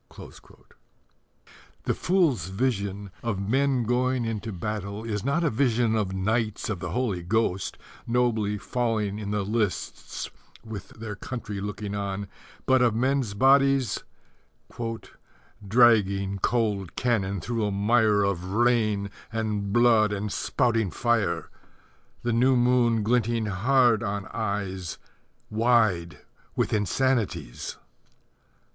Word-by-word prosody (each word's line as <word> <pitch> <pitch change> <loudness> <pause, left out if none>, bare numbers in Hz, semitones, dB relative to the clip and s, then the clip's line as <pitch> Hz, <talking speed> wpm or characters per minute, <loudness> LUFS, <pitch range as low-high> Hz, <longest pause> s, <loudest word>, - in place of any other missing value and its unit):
The - - +1
fool's 160 - +1
vision 100 -2 -2
of 115 -5 -2
men 130 +5 +1
going 125 +1 +1
into 110 0 -3
battle 100 +2 -4
is 105 -3 -3
not 140 +6 +1
a 165 - +2
vision 115 -2 +2
of 105 -4 0
knights 110 +3 -1
of 100 - -3
the - - -4
Holy 120 -8 -1
Ghost 95 0 0 0.3
nobly 115 -4 +1
falling 110 -3 -1
in 105 -2 -5
the 105 -1 0
lists 105 -2 -2 0.4
with 105 -4 -7
their 110 -2 -5
country 105 -3 -6
looking 105 0 -4
on, 100 0 -3 0.4
but 130 -1 +4
of 120 -3 +3
men's 130 -3 0
bodies 135 0 +3 1.6
Dragging 100 -4 +4
cold 105 -6 0
cannon 100 -6 0
through 115 +5 -2
a 105 - +1
mire 105 +1 +3
Of 100 -3 -1
rain 105 -1 +1 0.2
and 105 -3 -2
blood 115 -2 +4
and 105 0 -3
spouting 115 -6 +1
fire, 100 -8 0 0.7
The 120 -1 0
new 130 +3 +4
moon 120 -2 +3
glinting 115 0 +1
hard 115 +3 +3
on 100 0 -3
eyes 100 -5 -3 0.5
Wide 110 -7 +2 0.4
with - - 0
insanities! 110 - -1
110 Hz, 115 wpm, -26 LUFS, 100-120 Hz, 1.6 s, but